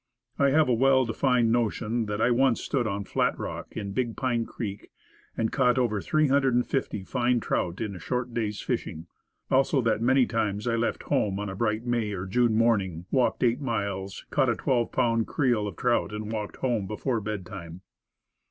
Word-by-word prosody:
I 140 -1 +5
have 155 +2 +4
a 125 - +3
well 130 +2 +4
defined 120 0 +2
notion 115 -1 0
that 105 0 -3
I 120 - +3
once 125 0 +3
stood 125 -5 -1
on 100 -1 -2
Flat - - 0
Rock, - - -6
in 100 -1 -4
Big 120 0 -2
Pine 120 -3 0
Creek, 100 -3 -6 0.5
and 115 0 0
caught 125 -2 +2
over 110 -5 +1
350 135 -7 +1
fine 125 +3 +1
trout 90 -4 -2
in 105 -3 -3
a - - -8
short 125 +4 -3
day's 105 -3 -2
fishing. 80 +2 -3 0.5
Also, 135 +1 +3
that 115 -1 +1
many 130 +2 +4
times 105 -3 -1
I 115 -1 +1
left 115 0 -1
home 100 -2 0
on 105 -1 -3
a 95 - -5
bright 110 +2 -1
May 120 -4 0
or 95 -1 -4
June 115 +3 +2
morning, 100 -7 +1
walked 130 -1 +1
eight 120 +2 +2
miles, 100 -6 -3
caught 135 -3 +2
a 115 - +2
twelve 120 -1 0
pound 115 -3 +1
creel 120 -8 +1
of 100 - -6
trout, 120 +1 +1
and 105 0 -5
walked 105 -2 -4
home 115 -7 -1
before 115 +3 -2
bedtime. 95 -4 -6
115 Hz, 185 wpm, -27 LUFS, 105-125 Hz, 0.5 s, I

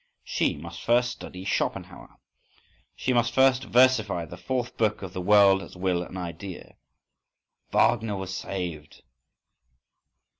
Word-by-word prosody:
She - - 0
must 85 +3 -9
first 120 +1 +2
study 95 -6 -9
Schopenhauer. - - -3 0.8
She 130 - -1
must 120 0 +1
first 130 0 +4
versify 115 -8 +3
the 85 - -10
fourth 120 +7 -3
book 110 -2 0
of 95 -2 -7
"The 95 - -4
World 100 0 +5
as 95 - -11
Will 90 -1 0
and 90 +1 -7
Idea." 90 +1 -7 1.0
_Wagner 110 -3 +2
was 95 -1 -5
saved. 90 -6 -6
95 Hz, 125 wpm, -26 LUFS, 90-120 Hz, 1.0 s, World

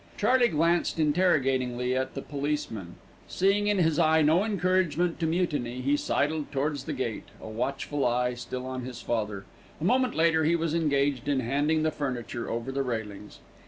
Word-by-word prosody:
Charley 255 -1 +4
glanced 170 -1 +1
interrogatingly 135 -7 +1
at 130 0 -2
the 135 - -4
policeman. 140 - -3 0.3
Seeing 200 +2 +2
in 205 -1 +2
his 160 -4 +2
eye 160 0 +4
no 160 +6 +4
encouragement 180 -4 +1
to 165 - 0
mutiny, 150 -8 -1
he 140 +3 +2
sidled 150 +1 -1
towards 145 -1 -2
the 155 - -3
gate, 125 -5 -3
a - - -9
watchful 135 +5 -2
eye 125 +1 +1
still 125 +1 -6
on 130 0 -4
his 125 -1 -7
father. 105 -4 -2 0.3
A - - -6
moment 255 +7 +2
later 160 -1 +3
he 165 +2 +3
was 165 -2 -1
engaged 140 -5 +1
in 140 -2 +1
handing 145 +6 +1
the 155 - +1
furniture 125 -5 -4
over 115 +3 -3
the 135 +1 -1
railings. 110 -5 -5
145 Hz, 170 wpm, -28 LUFS, 125-165 Hz, 0.3 s, Charley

